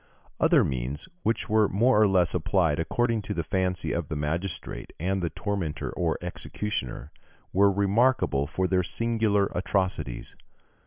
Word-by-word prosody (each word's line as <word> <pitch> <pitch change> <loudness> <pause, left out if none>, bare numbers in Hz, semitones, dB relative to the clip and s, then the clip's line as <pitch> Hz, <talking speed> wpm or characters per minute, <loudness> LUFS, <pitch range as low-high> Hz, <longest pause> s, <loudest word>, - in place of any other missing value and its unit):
Other - - +5
means, 65 +3 -3
which 115 - 0
were 110 -1 +3
more 110 +3 +3
or 105 - +6
less 90 -3 +2
applied 85 -3 +1
according 115 +6 0
to - - -5
the 85 - -1
fancy 90 -2 -1
of 85 -3 -2
the 75 - -4
magistrate 80 +6 -4
and 95 +3 0
the 85 - -1
tormentor 95 -7 -3
or - - -1
executioner, 75 -9 -4 0.4
were 100 +1 +5
remarkable 100 - +2
for 95 +4 -1
their 90 0 +2
singular 105 +1 0
atrocities. 90 -9 -2
95 Hz, 145 wpm, -27 LUFS, 80-105 Hz, 0.4 s, or